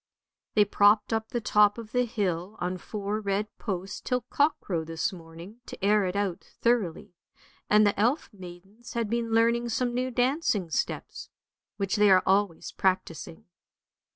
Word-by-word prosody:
" - - -65
They 210 -1 +5
propped 205 +2 +3
up 220 0 -2
the 240 - -2
top 210 -1 +3
of 225 -2 -9
the 250 0 +2
hill 200 -4 -2
on 180 +1 -3
four 210 +1 -4
red 205 +1 -2
posts 190 -2 -4
till 250 -1 -1
cockcrow 280 - 0
this 165 +3 -2
morning, 170 +6 -12
to - - -6
air 210 -1 +4
it 180 +1 -3
out 200 -3 -1 0.2
thoroughly; 215 -9 0 0.6
and 210 0 +6
the 200 -1 +1
elf 245 +9 +1
maidens 195 +5 -12
had 230 -2 -2
been 235 -1 -1
learning 235 +1 +2
some 245 +1 -1
new 255 +1 -1
dancing 245 - 0
steps, - - -3 0.5
which 195 -1 -1
they 210 0 +5
are 185 -1 +6
always 195 -3 +1
practising. 185 -3 -2
205 Hz, 160 wpm, -27 LUFS, 185-230 Hz, 0.6 s, and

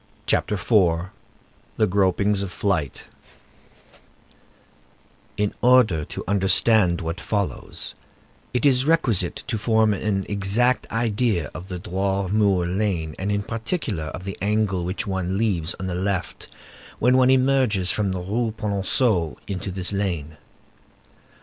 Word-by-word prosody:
CHAPTER 105 - +1
IV—THE 95 +1 -1
GROPINGS 100 +1 +1
OF 100 -2 -4
FLIGHT 90 -10 -1 2.3
In 105 0 0
order 120 -11 +4
to - - -7
understand 95 -1 +3
what 85 +2 -4
follows, 100 -3 -3 0.6
it 125 - 0
is 130 -2 +4
requisite 120 - +1
to 110 -3 -2
form 110 -1 +3
an 100 0 -1
exact 105 +5 +1
idea 110 -5 0
of 90 - -8
the 90 -2 -5
Droit 95 +2 -2
Mur 100 -4 +2
lane, 90 -4 -1
and, 100 +3 -1
in 100 0 0
particular, 115 - -3
of 90 +5 -7
the 95 0 -6
angle 100 -3 0
which 95 +6 -3
one 95 -2 -2
leaves 95 -7 0
on 95 - -4
the 95 - -3
left 95 +1 -3 0.5
when 125 +2 +3
one 130 0 +5
emerges 130 -8 +3
from 100 -3 0
the 95 -1 -3
Rue 110 +4 -2
Polonceau 100 - 0
into 95 -1 -4
this 95 +1 0
lane. 85 -6 -2
100 Hz, 130 wpm, -23 LUFS, 90-110 Hz, 2.3 s, one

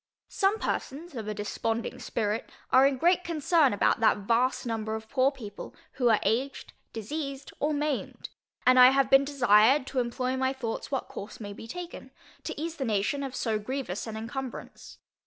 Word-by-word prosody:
Some 395 +2 +1
persons 320 -3 -4
of 225 -4 -6
a 215 - -2
desponding 225 +2 -3
spirit 215 0 -2 0.2
are 265 +1 +7
in 275 -1 -1
great 350 +5 +3
concern 325 -3 +2
about 205 - +2
that 225 - +4
vast 235 +6 +1
number 220 -2 -2
of 220 0 -7
poor 265 +2 +2
people, 220 -7 -9 0.2
who 245 -2 +1
are 220 - +4
aged, 260 +5 -1 0.2
diseased, 275 +5 -5
or 300 - +1
maimed; 295 -2 -3 0.4
and 255 0 +6
I 250 0 +10
have 270 0 +2
been 270 +1 +6
desired 255 -1 +4
to 265 - -2
employ 250 +1 -1
my 260 0 +1
thoughts 240 -4 -4
what 270 -2 -2
course 205 +2 -8
may 205 -2 -6
be 225 - -10
taken, 350 +7 -8 0.4
to - - -5
ease 325 +1 -4
the 275 - -2
nation 215 +5 0
of 270 -2 -5
so 220 -4 -1
grievous 235 -3 -4
an 220 -1 -5
incumbrance. 250 +3 -7
255 Hz, 180 wpm, -28 LUFS, 225-275 Hz, 0.4 s, I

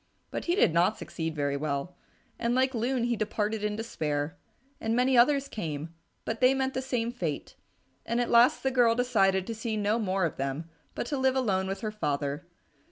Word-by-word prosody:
But - - -4
he 345 - +2
did 180 - +4
not 175 +6 +3
succeed 160 -2 -4
very 145 -1 0
well, 145 +4 -3 0.4
and 235 +1 +1
like 260 +1 +2
Loon 245 +1 0
he 240 0 +1
departed 215 0 -2
in 210 0 0
despair. 155 -8 -2 0.4
And 225 +1 -1
many 255 +2 +3
others 275 +3 +4
came, 160 - -5 0.3
but 225 +2 -3
they 255 +1 +5
met 265 0 0
the 260 - -1
same 245 -3 -1
fate, 170 - -4 0.5
and 235 +1 -1
at 245 - 0
last 235 +2 +5
the 265 - +1
girl 240 -3 +4
decided 195 -6 +2
to 230 - -4
see 220 0 -3
no 210 +2 +1
more 190 -4 +1
of 165 - -3
them, 135 +4 -3 0.3
but - - -2
to 280 +2 -2
live 265 0 +2
alone 195 -7 +1
with 195 +1 -4
her 215 -2 -2
father. 145 -3 -2
220 Hz, 200 wpm, -28 LUFS, 170-245 Hz, 0.5 s, they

